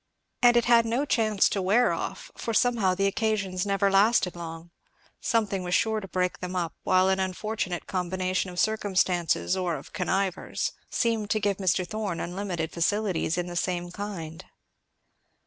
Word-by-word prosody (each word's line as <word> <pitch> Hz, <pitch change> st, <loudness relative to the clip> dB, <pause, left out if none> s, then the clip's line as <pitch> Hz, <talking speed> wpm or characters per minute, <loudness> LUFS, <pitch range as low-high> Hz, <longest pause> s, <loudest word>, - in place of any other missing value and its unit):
And 240 Hz, -1 st, +6 dB
it 235 Hz, -, +3 dB
had 235 Hz, -1 st, +6 dB
no 245 Hz, +6 st, 0 dB
chance 215 Hz, -7 st, +2 dB
to 195 Hz, -, -1 dB
wear 210 Hz, +7 st, +3 dB
off, -, -, -5 dB
for 230 Hz, -, -3 dB
somehow 225 Hz, -7 st, +3 dB
the 195 Hz, +1 st, +1 dB
occasions 200 Hz, -2 st, 0 dB
never 200 Hz, 0 st, +2 dB
lasted 195 Hz, -2 st, +3 dB
long; 165 Hz, 0 st, -8 dB, 0.5 s
something 205 Hz, -4 st, 0 dB
was 180 Hz, 0 st, 0 dB
sure 220 Hz, -1 st, +2 dB
to 195 Hz, -, -8 dB
break 180 Hz, 0 st, -1 dB
them 180 Hz, 0 st, -5 dB
up; 170 Hz, -3 st, -1 dB
while 185 Hz, 0 st, +3 dB
an 190 Hz, 0 st, +2 dB
unfortunate 190 Hz, -1 st, -3 dB
combination 185 Hz, +1 st, -1 dB
of 180 Hz, 0 st, -6 dB
circumstances, 190 Hz, -5 st, +1 dB
or 180 Hz, -3 st, -1 dB
of 140 Hz, -, -10 dB
connivers, 190 Hz, 0 st, -1 dB, 0.2 s
seemed 225 Hz, -3 st, 0 dB
to 215 Hz, -, +1 dB
give 200 Hz, -2 st, 0 dB
Mr. 185 Hz, -1 st, +1 dB
Thorn 205 Hz, -4 st, -3 dB
unlimited 175 Hz, -3 st, -3 dB
facilities 180 Hz, -1 st, 0 dB
in 175 Hz, -, -1 dB
the 175 Hz, 0 st, -7 dB
same 175 Hz, -1 st, -2 dB
kind. 180 Hz, -5 st, -6 dB
190 Hz, 165 wpm, -27 LUFS, 180-215 Hz, 0.5 s, And